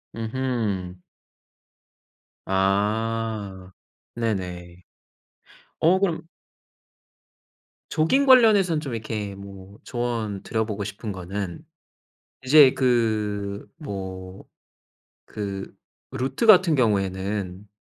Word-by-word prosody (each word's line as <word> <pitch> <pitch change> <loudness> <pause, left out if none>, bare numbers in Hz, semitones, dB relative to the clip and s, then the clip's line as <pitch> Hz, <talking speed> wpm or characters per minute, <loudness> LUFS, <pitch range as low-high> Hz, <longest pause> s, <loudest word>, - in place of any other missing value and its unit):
음흠. 110 -6 -2 1.5
아 100 0 -1 0.4
네네. 90 -6 -4 1.0
어 175 +4 +4
그럼 165 -4 -1 1.6
조깅 215 - +2
관련해서는 205 -11 +6
좀 135 -6 -5
이렇게 105 -3 -4
뭐 100 0 -12
조언 115 -5 -3
드려보고 110 -2 -2
싶은 100 +2 -6
거는 95 - -5 0.8
이제 135 0 +7
그 105 -5 0
뭐 95 - -7 0.9
그 100 -2 -5 0.4
루트 135 - -1
같은 185 -6 +7
경우에는 100 -4 -1
105 Hz, 145 characters per minute, -24 LUFS, 95-130 Hz, 1.6 s, 이제